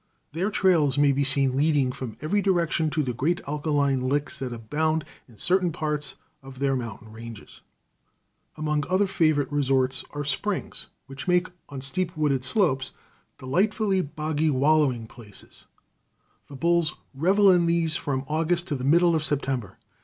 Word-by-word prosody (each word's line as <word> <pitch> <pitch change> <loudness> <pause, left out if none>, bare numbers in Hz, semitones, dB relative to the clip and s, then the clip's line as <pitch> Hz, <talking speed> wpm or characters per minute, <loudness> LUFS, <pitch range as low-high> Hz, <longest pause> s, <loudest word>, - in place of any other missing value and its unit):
Their 175 +7 -1
trails 165 -9 +2
may 145 0 +5
be 140 +1 +1
seen 135 -1 +2
leading 145 -2 +2
from 125 -3 -7
every 200 +7 +1
direction 170 -4 +1
to 155 0 0
the 125 -2 -2
great 160 +9 0
alkaline 145 -2 0
licks 140 +3 -1
that 130 -2 -4
abound 150 +7 -1 0.2
in 115 -4 -19
certain 180 - +1
parts 150 -1 -3 0.3
of 135 -1 -12
their 135 0 +1
mountain 115 -3 -6
ranges. 115 -1 -11 1.0
Among 150 -1 0
other 185 +2 +2
favorite 155 -7 +1
resorts 135 -2 +1
are 145 0 -5
springs, 180 +8 -3 0.2
which 135 +3 -8
make, 180 0 +2 0.2
on 140 -2 -7
steep 170 +6 -2
wooded 140 -4 +1
slopes, 135 - +1 0.4
delightful, 195 - +1
boggy 155 0 -1
wallowing 140 -4 +2
places. 110 -3 -15 0.8
The 140 - -11
bulls 170 +1 +1 0.2
revel 190 +8 +4
in 175 -2 +3
these 170 -2 +2
from 135 -3 -2
August 165 +3 0
to 145 - 0
the 130 - -5
middle 170 +5 +4
of 160 -1 0
September. 135 - -2
150 Hz, 155 wpm, -25 LUFS, 135-170 Hz, 1.0 s, may